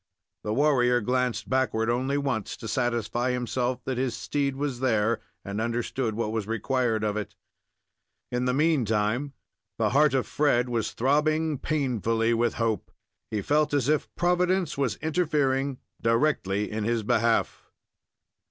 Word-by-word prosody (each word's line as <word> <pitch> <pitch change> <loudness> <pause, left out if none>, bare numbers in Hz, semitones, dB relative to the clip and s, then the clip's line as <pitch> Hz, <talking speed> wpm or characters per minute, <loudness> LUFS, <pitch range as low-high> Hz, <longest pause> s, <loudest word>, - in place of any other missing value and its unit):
The 105 - -2
warrior 125 -4 +3
glanced 125 +1 -1
backward 120 -4 +1
only 130 +4 0
once, 135 -8 -2
to 115 - -7
satisfy 120 +1 0
himself 125 0 -1
that 130 -2 -2
his 125 -3 -1
steed 140 -2 -1
was 140 -3 -3
there, 115 -3 +1 0.2
and 100 +2 -3
understood 115 0 -2
what 110 -1 -1
was 110 -2 -2
required 115 0 0
of 105 -1 0
it. 105 - -5 1.0
In 125 0 0
the 125 - +1
meantime, 130 -3 +1 0.4
the 110 -2 +2
heart 145 +1 +4
of 130 - +1
Fred 125 -4 +1
was 115 -3 -1
throbbing 150 +3 +1
painfully 115 -6 0
with 115 0 +1
hope. 115 -4 -1 0.4
He 105 -3 -2
felt 150 0 +2
as 135 -3 +1
if 150 0 +1
Providence 180 -1 +1
was 135 -7 0
interfering 145 -5 +1 0.2
directly 115 -4 +1
in 110 0 -2
his 115 0 0
behalf. 115 +2 +1
125 Hz, 145 wpm, -27 LUFS, 115-140 Hz, 1.0 s, heart